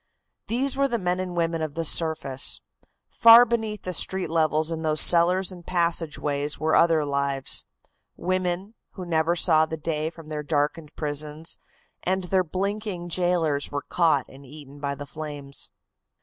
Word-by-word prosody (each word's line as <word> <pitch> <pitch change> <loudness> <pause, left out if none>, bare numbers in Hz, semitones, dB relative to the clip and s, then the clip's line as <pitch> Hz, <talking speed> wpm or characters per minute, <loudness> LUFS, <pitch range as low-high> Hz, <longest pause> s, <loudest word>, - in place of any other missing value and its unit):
These 260 +4 0
were 275 0 +2
the 240 -3 -1
men 180 -3 -1
and 185 -1 -4
women 165 -1 0
of 155 -2 -4
the 165 0 -2
surface. 155 -5 +3 0.5
Far 230 +1 +8
beneath 220 -3 -3
the 185 - -4
street 180 -1 -1
levels 155 -1 +1
in 160 -1 -3
those 155 -1 +1
cellars 180 +2 +4
and 175 -2 -11
passageways 155 -4 0
were 160 0 0
other 165 -3 +3
lives. 140 -1 0 0.5
Women, 185 +2 -2 0.2
who 185 - -7
never 165 0 +1
saw 160 -2 +3
the 160 - -5
day 155 0 -2
from 165 -2 -14
their 150 -1 -4
darkened 150 +1 -2
prisons, 150 +1 -3 0.4
and 190 +1 -1
their 185 +1 +1
blinking 190 0 -4
jailors 170 -4 0
were 145 0 -3
caught 160 -7 +1
and 135 +1 -15
eaten 145 +1 -13
by 140 -1 -3
the 145 +1 -8
flames." 145 -2 -7
165 Hz, 160 wpm, -25 LUFS, 150-180 Hz, 0.5 s, Far